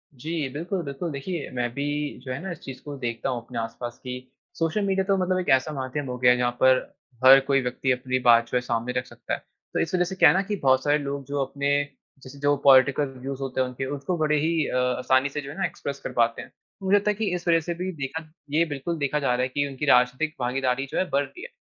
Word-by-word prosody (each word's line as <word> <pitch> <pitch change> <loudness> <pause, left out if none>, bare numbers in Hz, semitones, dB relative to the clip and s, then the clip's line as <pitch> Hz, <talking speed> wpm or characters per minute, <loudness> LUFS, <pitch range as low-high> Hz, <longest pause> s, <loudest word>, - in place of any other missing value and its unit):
जी, 155 +3 -3
बिल्कुल, 175 +5 -3
बिल्कुल। 145 +3 -4
देखिए, 145 +3 -4
मैं 120 -1 -1
भी 145 +1 -2
जो 130 - -6
है 130 - -3
ना, 190 +1 -5
इस 170 - -7
चीज़ 130 -1 -9
को 145 -1 -6
देखता 120 -3 -3
हूँ 120 -2 -2
अपने 120 -1 -5
आस-पास 120 +1 -5
कि 125 0 -7 0.3
सोशल 165 +5 +1
मीडिया 195 0 +1
तो 195 -1 +2
मतलब 185 0 +1
एक 180 - -3
ऐसा 130 +4 -2
माध्यम 135 +1 -3
हो 125 - -4
गया 125 0 +5
है, 125 - +3
जहाँ 125 0 +1
पर 130 0 +6 0.5
हर 135 +1 +10
कोई 135 -1 +3
व्यक्ति 125 +1 -1
अपनी 130 0 0
बात 115 -1 +6
जो - - +2
है, 125 - 0
सामने 120 0 -2
रख 125 - -1
सकता - - -7
है। - - -1 0.3
तो - - 0
इस 165 - -1
वजह 180 - +3
से 190 - -5
क्या - - +7
है - - +3
ना 190 - +3
कि 205 +1 -2
बहुत 130 -1 +4
सारे 145 0 +3
लोग 140 -1 -4
जो 140 +1 -2
अपने, 140 +1 -2 0.5
जैसे 140 +2 -11
जो 145 0 +3
पॉलिटिकल 140 +1 +6
व्यूज़ 135 +1 -5
होते 130 -1 -1
हैं 130 - +1
उनके, 125 +1 -5
उसको 145 +6 -3
बड़े 150 -1 +2
ही 160 0 +1
अ, - - -3
आसानी 130 +2 +2
से 150 +1 -4
जो 140 - -9
है 150 - -10
ना, 190 - +1
एक्सप्रेस 140 -3 -5
कर - - -4
पाते 115 -1 +1
हैं। - - -12 0.3
मुझे 190 +1 +4
लगता 205 +1 +1
है - - -3
कि 220 +2 -2
इस 175 0 -6
वजह 165 -1 +5
से 170 +2 -4
भी 180 +2 -4
देखा 155 +2 -5 0.2
ये 160 +3 +4
बिल्कुल 160 +2 -4
देखा 145 0 0
जा 135 -4 +1
रहा 125 - 0
है 130 - +1
कि 145 +2 -1
उनकी 140 +2 -4
राजनीतिक 125 +4 +3
भागीदारी 130 +1 0
जो - - -3
है, 185 - +2
बढ़ 140 +1 +2
रही 360 - -11
है। 485 - -8
140 Hz, 270 wpm, -25 LUFS, 130-160 Hz, 0.5 s, हर